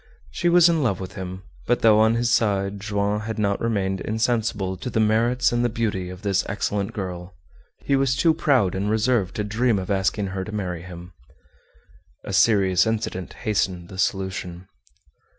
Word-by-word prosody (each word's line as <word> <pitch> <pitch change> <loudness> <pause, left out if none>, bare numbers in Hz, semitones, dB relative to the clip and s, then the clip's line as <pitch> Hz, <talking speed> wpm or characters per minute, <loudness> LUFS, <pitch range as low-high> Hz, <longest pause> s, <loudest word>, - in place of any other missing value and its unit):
She 175 - 0
was 175 0 +6
in 165 -2 +2
love 105 -9 0
with 95 0 -7
him, 95 0 -7 0.2
but 120 - +1
though 110 -1 +6
on 110 +1 +4
his 120 0 0
side 100 -3 +1
Joam 100 0 -1
had 110 +1 -5
not 100 -2 0
remained 95 -4 -1
insensible 110 -4 -1
to 125 - -5
the 110 - -1
merits 115 +4 +2
and 120 0 +1
the 120 - +2
beauty 105 -6 -2
of 90 +2 -10
this 100 -2 +1
excellent 100 0 -2
girl, 90 -2 -6 0.5
he 140 - +2
was 135 -1 +2
too 160 +3 +3
proud 135 - +2
and 100 +2 -2
reserved 110 -3 +1
to 105 - -1
dream 110 +2 +1
of 95 +1 -4
asking 100 +1 0
her 95 -1 -3
to 110 - -8
marry 90 -5 -4
him. 90 0 -10 1.1
A - - -6
serious 95 -3 +4
incident 110 -4 -3
hastened 95 -5 -1
the 95 - -9
solution. 95 -3 -2
105 Hz, 180 wpm, -23 LUFS, 95-115 Hz, 1.1 s, was